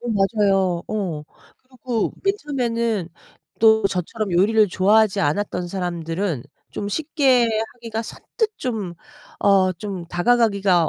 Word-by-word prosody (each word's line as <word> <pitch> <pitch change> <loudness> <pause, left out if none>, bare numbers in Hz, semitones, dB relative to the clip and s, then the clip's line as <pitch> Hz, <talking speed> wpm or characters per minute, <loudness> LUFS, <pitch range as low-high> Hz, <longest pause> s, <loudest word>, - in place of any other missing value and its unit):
어 240 - -6
맞아요. 195 -4 +2
어. 185 -8 -3 0.3
그리고 255 -3 -3
맨 395 0 +2
처음에는 235 - -1 0.5
또 220 -2 +5
저처럼 195 +3 -3
요리를 210 +4 +4
좋아하지 205 +2 +3
않았던 180 +4 -1
사람들은 175 -4 -3 0.3
좀 200 - -4
쉽게 270 -2 +2 0.3
하기가 230 -2 -5
선뜻 435 - -3
좀 215 -9 -3 0.5
어 195 -2 +4
좀 185 0 -6
다가가기가 195 -2 +2
205 Hz, 260 characters per minute, -22 LUFS, 185-230 Hz, 0.5 s, 또